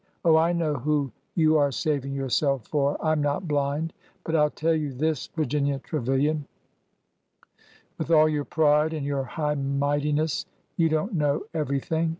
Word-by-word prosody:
Oh, 165 -2 +6
I 165 +2 +4
know 165 -3 0
who 145 0 0 0.2
you 155 -2 +4
are 145 -1 +2
saving 140 -1 -1
yourself 135 -2 0
for 145 -1 +1
1 - - -1
I - - +4
'm 155 -1 +1
not 145 +5 -1
blind! 145 +2 -1 0.3
But 165 - -2
I 155 - +4
'll - - 0
tell 165 +2 0
you 150 -3 -2
this, 155 +2 -1
Virginia 145 -2 0
Trevilian, 140 +2 -1 0.8
— - - -32
with - - -3
all 155 -2 +6
your 150 -2 -1
pride 155 0 +2
and 150 -3 -3
your 140 -1 -1
high 150 +3 -2
mightiness, 145 +2 0 0.3
you 165 -1 +2
don't 155 +8 -1
know 150 -3 +1
every 145 -4 -1
thing! 160 +4 -1
150 Hz, 175 wpm, -26 LUFS, 140-160 Hz, 0.8 s, Oh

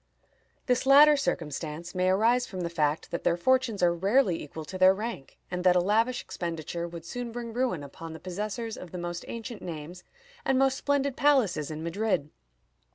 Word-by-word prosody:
This 250 0 +1
latter 295 +2 +8
circumstance 160 - -3
may 185 0 +1
arise 230 +6 +3
from 185 -2 -6
the 170 -1 -3
fact 150 -2 0
that 170 - -3
their 170 - +2
fortunes 255 -1 +1
are 175 -1 +5
rarely 190 +1 +2
equal 155 +2 -8
to 185 +4 -7
their 185 +1 +7
rank, 215 - -6
and 180 0 -3
that 180 -1 +5
a - - +5
lavish 225 +7 +1
expenditure 170 0 -4
would 170 -1 -9
soon 245 +4 -5
bring 235 -1 -6
ruin 240 - -1
upon 160 +3 -9
the 160 - -9
possessors 210 +5 -4
of 180 - -9
the 180 - -7
most 175 0 -4
ancient 230 -2 -6
names 170 +1 -7 0.4
and 265 - +2
most 270 0 +3
splendid 280 -1 0
palaces 240 - +2
in 155 0 -5
Madrid." 170 -4 -1
185 Hz, 185 wpm, -28 LUFS, 170-240 Hz, 0.4 s, latter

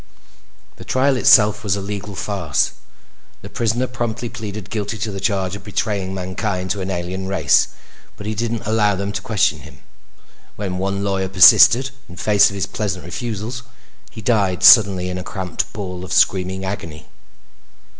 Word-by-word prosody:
The - - -10
trial 135 +1 +1
itself 105 -5 +5
was 100 -2 0
a - - -4
legal 100 +1 -6
farce. 90 -6 -1 0.7
The - - -10
prisoner 115 +2 0
promptly 120 -2 -4
pleaded 105 -3 -8
guilty 110 0 -3
to 105 +1 -4
the 95 - -6
charge 95 -2 -1
of 100 - -10
betraying 100 -2 -2
mankind 95 0 -3
to 100 0 -2
an 95 - -4
alien 95 +1 -4
race, 95 0 +3 0.5
but 105 - -9
he 110 - -2
didn't 115 +1 -3
allow 105 -1 +2
them 100 +1 -3
to - - -4
question 110 -5 0
him. - - -15 0.7
When 95 -3 -4
one 100 +1 -2
lawyer 95 -1 -1
persisted 115 +7 +7 0.2
in 90 - -11
face 105 +1 +4
of 100 - -8
his 95 -1 -2
pleasant 95 -5 -4
refusals, 115 +5 -5 0.5
he 110 - -11
died 100 -5 +1
suddenly 95 -5 +7
in 90 0 -4
a - - -6
cramped 95 -3 -4
ball 90 -3 -6
of 95 - -6
screaming 95 0 +1
agony. 85 -6 -6
100 Hz, 165 wpm, -19 LUFS, 95-110 Hz, 0.7 s, persisted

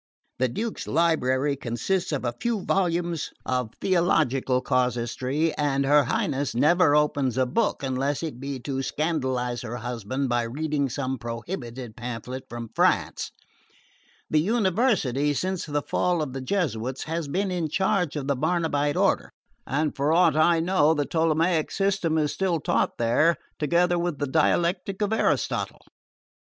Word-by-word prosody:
The 130 - +3
Duke's 220 - -4
library 145 -4 +2
consists 135 - -2
of 140 -4 -2
a 120 - -1
few 235 -4 0
volumes 175 -3 0 0.2
of 125 -3 -1
theological 150 -8 +2
casuistry, 125 +5 0
and 140 -2 +1
her 145 0 +5
Highness 140 +1 -1
never 150 +4 +4
opens 145 -4 +1
a 130 - +3
book 125 - 0
unless 135 +3 -1
it 150 -7 -5
be 135 0 -4
to 135 +1 -3
scandalise 130 -5 -1
her 120 0 -5
husband 125 +2 -3
by 120 -1 +1
reading 140 +4 -1
some 130 0 -3
prohibited 120 - -6
pamphlet 125 +2 -6
from 120 -2 -7
France. - - +1 1.0
The 155 - +2
University, 185 - +1
since 185 +2 -2
the 145 -1 -1
fall 175 -3 0
of 135 -4 -6
the 135 - -4
Jesuits, 130 - -2
has 165 -1 -3
been 190 +6 -1
in 170 -3 -1
charge 190 -2 +1
of 145 -3 -3
the 140 0 +1
Barnabite 150 -1 0
order, - - +1 0.4
and, 150 +2 0
for 140 +2 +1
aught 165 -2 +4
I 165 +2 +4
know, 165 -3 +3
the 145 -1 0
Ptolemaic 165 +1 +1
system 195 -5 0
is 150 -2 +1
still 185 -4 0
taught - - 0
there, 120 +9 +3 0.2
together 175 +3 +2
with 170 -3 -1
the 145 - -1
dialectic 175 +7 +1
of 205 +1 0
Aristotle. 220 - 0
145 Hz, 150 wpm, -25 LUFS, 130-170 Hz, 1.0 s, her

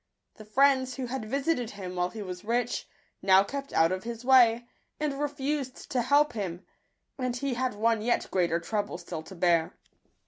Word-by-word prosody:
The 215 - -11
friends, 260 +2 +3
who 260 - -3
had 245 -1 -4
visited 270 0 -1
him 185 -4 -7
while 180 0 0
he 215 +1 -7
was 180 -2 -7
rich, 240 +2 -1 0.3
now 190 0 +6
kept 275 +6 -6
out 165 +1 +3
of 185 0 -3
his 235 +1 -6
way, 240 -2 +5 0.3
and 290 -2 -2
re 295 - +2
fused 280 -2 -4
to 250 - +1
help 285 +4 +3
him; 185 -4 -4 0.5
and 255 -1 -1
he 270 +1 -2
had 250 -1 -1
one 225 +1 +1
yet 240 +2 0
greater 170 -2 +1
trouble 205 +3 -3
still 175 -2 -6
to 190 +4 -12
bear. 170 -2 +2
230 Hz, 185 wpm, -28 LUFS, 190-265 Hz, 0.5 s, now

